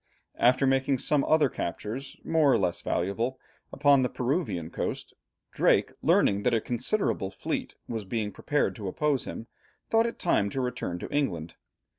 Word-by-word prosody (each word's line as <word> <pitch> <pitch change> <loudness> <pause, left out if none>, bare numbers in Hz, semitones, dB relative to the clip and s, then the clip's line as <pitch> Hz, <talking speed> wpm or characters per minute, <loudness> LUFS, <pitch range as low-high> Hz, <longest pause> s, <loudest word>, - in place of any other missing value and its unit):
After 130 +3 +4
making 135 0 +2
some 140 +2 +2
other 155 -2 +4
captures 120 +5 -5
more 155 -4 +3
or - - +4
less 90 -3 -1
valuable, 115 +9 -1 0.3
upon 140 -1 +4
the 125 - +1
Peruvian 125 - -2
coast, - - -4 0.4
Drake, - - +3
learning 100 0 +3
that 115 - +2
a - - +3
considerable 125 - -1
fleet 95 - -4
was 115 -2 -4
being 105 +1 -2
prepared 145 +6 0
to 105 -3 -5
oppose 140 +6 0
him, 115 - -6 0.5
thought 225 +1 +4
it 230 - -5
time 100 - +1
to 135 - -4
return 125 -8 -3
to - - -7
England. 85 - -1
125 Hz, 160 wpm, -28 LUFS, 100-145 Hz, 0.5 s, After